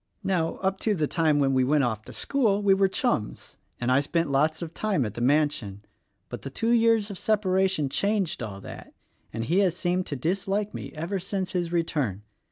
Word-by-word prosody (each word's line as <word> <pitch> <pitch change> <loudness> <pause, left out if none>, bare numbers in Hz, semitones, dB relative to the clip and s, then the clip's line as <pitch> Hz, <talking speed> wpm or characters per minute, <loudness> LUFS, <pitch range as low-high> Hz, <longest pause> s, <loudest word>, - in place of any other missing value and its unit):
Now, 180 -4 0
up 190 0 0
to 215 -2 +1
the 155 -4 +1
time 155 -1 +2
when 135 -2 +2
he 130 - +4
went 145 +2 +3
off 110 -4 -1
to - - -10
school 215 -7 +1
we 195 -1 +5
were 195 0 +3
chums, 190 - -2 0.2
and 120 +1 0
I 130 - +5
spent 155 +1 -1
lots 155 +4 +1
of 165 -1 -7
time 200 - 0
at 105 - -4
the 120 - -6
mansion; 125 -7 +1 0.4
but 120 - -7
the 135 - -6
two 225 - -1
years 225 -3 +3
of 190 - -7
separation 190 -6 +1
changed 200 +1 0
all 105 -4 -5
that, - - -10 0.4
and 115 +1 -3
he 170 +10 +2
has 180 -3 +2
seemed 180 +1 -1
to 145 - -3
dislike 195 +8 -1
me - - -6
ever 170 +6 -3
since 190 0 -3
his 175 -2 -2
return. 145 - -1
170 Hz, 205 wpm, -26 LUFS, 135-195 Hz, 0.4 s, we